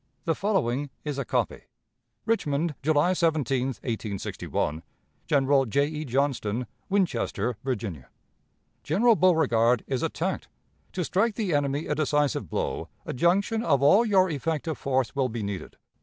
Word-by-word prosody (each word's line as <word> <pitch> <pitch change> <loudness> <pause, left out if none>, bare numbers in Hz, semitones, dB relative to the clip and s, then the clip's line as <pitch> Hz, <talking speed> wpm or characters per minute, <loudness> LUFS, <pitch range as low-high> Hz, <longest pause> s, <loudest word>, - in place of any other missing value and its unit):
The 165 - +2
following 145 - 0 0.2
is 145 -2 -3
a 135 - -2
copy: - - -1 0.6
"'Richmond, 160 -7 0
July 155 +4 +3
17, 145 -7 +1
1861. 105 - -3 0.5
"'General 135 -1 +3
J. 140 +6 +2
E. 155 +1 -4
Johnston, 125 -3 0 0.2
Winchester, 185 - 0
Virginia. 100 - -4 0.7
"'General 225 +9 +3
Beauregard 125 - +3
is 130 -3 -2
attacked. - - -2 0.5
To 180 - -1
strike 205 +6 +1
the 200 -7 -1
enemy 145 +1 0
a - - -1
decisive 150 -2 0
blow, - - -2 0.2
a - - -4
junction 195 - +2
of 140 - +2
all 195 +11 +6
your 195 -5 +4
effective 160 0 -2
force 130 -1 0
will 135 -2 +1
be 115 -1 -4
needed. 100 -2 -5
145 Hz, 135 wpm, -26 LUFS, 125-170 Hz, 0.7 s, all